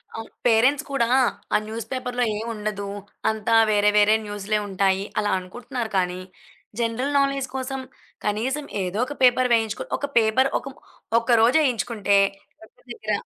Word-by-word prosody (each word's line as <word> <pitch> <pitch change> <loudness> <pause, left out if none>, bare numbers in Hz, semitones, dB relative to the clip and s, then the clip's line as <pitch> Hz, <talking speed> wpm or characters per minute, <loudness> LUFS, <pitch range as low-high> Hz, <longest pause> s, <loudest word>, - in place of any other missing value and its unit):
అవును. 225 0 -7 0.2
పేరెంట్స్ 255 +6 +4
కూడా, 235 -4 +1 0.5
ఆ - - +6
న్యూస్ 225 +1 -6
పేపర్‌లో 250 -1 -2
ఏముండదు. 210 -2 -4 0.4
అంతా 220 +1 0 0.2
వేరే 210 0 +4
వేరే 210 +1 +5
న్యూస్‌లే 205 +1 -2
ఉంటాయి 195 0 +1 0.2
అలా 205 -1 0
అనుకుంటున్నారు. 240 +5 -6
కానీ 180 -1 0 0.6
జనరల్ 240 +5 -1
నాలెడ్జ్ 275 -1 0
కోసం, 265 0 -3 0.4
కనీసం 250 +8 -1 0.2
ఏదో 185 +3 -3
ఒక 290 - -7
పేపర్ 250 0 +4
వేయించుకొ 225 -2 0
ఒక - - -3
పేపర్ 230 +4 +3
ఒక - - -11 0.5
ఒక్క 235 - -11
రోజేయించుకుంటే, 230 - +2 0.4
వర్క్ 220 - -19
దెగ్గర 215 -2 -3
225 Hz, 135 wpm, -23 LUFS, 210-255 Hz, 0.6 s, ఆ